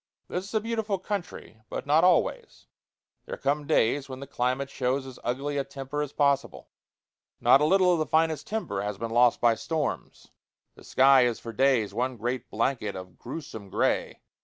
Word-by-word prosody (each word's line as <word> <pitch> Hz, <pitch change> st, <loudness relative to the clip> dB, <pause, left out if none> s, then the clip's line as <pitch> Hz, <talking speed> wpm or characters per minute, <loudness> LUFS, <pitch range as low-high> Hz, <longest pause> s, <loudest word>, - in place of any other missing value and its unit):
This 180 Hz, +1 st, -3 dB
is 200 Hz, -, -11 dB
a -, -, +4 dB
beautiful 220 Hz, -2 st, -2 dB
country, 185 Hz, -, -6 dB
but -, -, -5 dB
not 150 Hz, +4 st, +4 dB
always; 180 Hz, -2 st, +1 dB, 0.6 s
there -, -, -5 dB
come 145 Hz, +1 st, -1 dB
days 135 Hz, +4 st, +2 dB
when 130 Hz, 0 st, -7 dB
the 140 Hz, -, -7 dB
climate 130 Hz, +1 st, -2 dB
shows 130 Hz, +1 st, -1 dB
as 130 Hz, -2 st, -10 dB
ugly 140 Hz, +4 st, -2 dB
a -, -, 0 dB
temper 135 Hz, +2 st, -5 dB
as 145 Hz, -2 st, -3 dB
possible. 140 Hz, -2 st, 0 dB, 0.7 s
Not 135 Hz, -, +5 dB
a -, -, +4 dB
little 185 Hz, +2 st, +4 dB
of 170 Hz, -, 0 dB
the 155 Hz, -, -1 dB
finest 160 Hz, -2 st, +1 dB
timber 110 Hz, -, -3 dB
has 105 Hz, -1 st, -4 dB
been 115 Hz, +2 st, -4 dB
lost 120 Hz, +1 st, +4 dB
by 120 Hz, -1 st, +4 dB
storms. 155 Hz, +4 st, -4 dB, 0.4 s
The -, -, -17 dB
sky 135 Hz, -1 st, +5 dB
is 120 Hz, -2 st, 0 dB
for 115 Hz, -, -8 dB
days 125 Hz, -5 st, +2 dB
one 125 Hz, +3 st, -2 dB
great 120 Hz, +2 st, -3 dB
blanket 115 Hz, -3 st, -1 dB
of 90 Hz, -2 st, -10 dB
grewsome 120 Hz, -7 st, -8 dB
gray. -, -, 0 dB
135 Hz, 185 wpm, -27 LUFS, 120-155 Hz, 0.7 s, Not